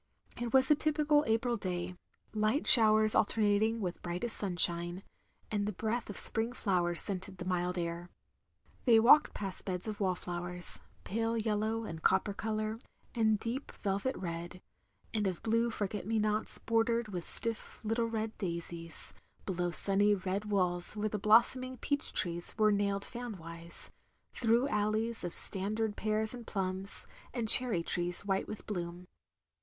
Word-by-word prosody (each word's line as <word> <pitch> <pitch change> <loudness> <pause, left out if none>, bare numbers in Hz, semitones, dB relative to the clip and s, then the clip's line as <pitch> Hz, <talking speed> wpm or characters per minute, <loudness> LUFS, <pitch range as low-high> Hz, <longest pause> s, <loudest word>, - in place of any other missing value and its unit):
It 240 -1 -3
was 265 +1 +4
a - - +7
typical 300 0 +2
April 230 +2 +1
day; 180 -2 -2 0.4
light 215 +7 0
showers 215 -2 +6
alter 220 - +1
nating 215 +2 +2
with 180 -3 -4
brightest 180 +7 -3
sunshine, 175 -1 +1 0.5
and 205 -1 -1
the - - -1
breath 220 +4 -3
of 205 - -6
spring 225 +2 +2
flowers 175 -7 0
scenting 190 0 -1
the 175 - -8
mild 180 0 -1
air. 170 0 -4 0.8
They 230 -3 +6
walked 245 +7 +6
past 195 -2 -5
beds 180 +1 -4
of 215 -1 -5
wallflowers, 180 -2 -3 0.2
pale 225 +2 -1
yellow 220 +1 -1
and 165 -6 -7
copper 190 +3 +2
colour, 215 +1 -3 0.3
and 220 -3 +2
deep 245 +5 -4
velvet 200 +7 -2
red; 175 0 -6 0.5
and 210 -3 0
of 185 -2 -4
blue 230 +1 +1
forget 205 -3 -4
me 225 0 0
nots 215 0 +1
bordered 230 0 0
with 180 -4 -6
stiS 230 -1 -5
little 225 +2 0
red 220 -1 -3
daisies; 170 -2 -6 0.3
below 175 -2 -1
sunny 200 +3 +2
red 195 +2 -3
walls 180 -2 0
where 215 +1 -1
the 210 - -3
blossoming 255 +5 +3
peach 285 +4 -2
trees 175 -1 -2
were 215 -1 +4
nailed 200 -1 0
fan 240 -4 -7
wise; 170 0 -6 0.4
through 235 +2 +2
alleys 215 0 -1
of 175 - -3
standard 210 +2 +6
pears 215 +1 -1
and 240 -2 -9
plums, 190 0 -2 0.3
and 235 -3 -2
cherry 215 -7 +7
trees 175 +3 -2
white 195 -1 -1
with 215 - -8
bloom. 175 -3 -5
210 Hz, 155 wpm, -32 LUFS, 180-225 Hz, 0.8 s, a